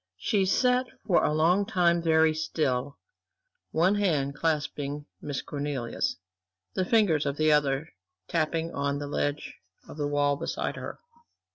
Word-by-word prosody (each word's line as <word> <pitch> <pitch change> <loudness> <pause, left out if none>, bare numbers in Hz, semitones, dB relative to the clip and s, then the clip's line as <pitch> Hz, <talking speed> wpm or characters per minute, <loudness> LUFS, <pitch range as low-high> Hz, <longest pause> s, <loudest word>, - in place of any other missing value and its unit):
She 195 - +1
sat 250 +5 +2 0.2
for 180 - +3
a - - +2
long 165 +6 +3
time 175 -3 +2
very 160 -1 +4
still, 145 -4 -1 0.7
one 175 +5 +3
hand 155 -9 +1
clasping 150 -2 -2 0.2
Miss 145 -2 -4
Cornelia's, 140 -5 -3 0.6
the 185 - 0
fingers 180 -10 +3
of 140 +1 -2
the 155 0 +3
other 145 0 +2 0.4
tapping 165 0 -1
on 140 0 -1
the 145 - -4
ledge 145 +1 -3 0.3
of - - -10
the 145 -1 -1
wall 145 -1 +1
beside - - -3
her. - - -7
155 Hz, 140 wpm, -28 LUFS, 145-170 Hz, 0.7 s, very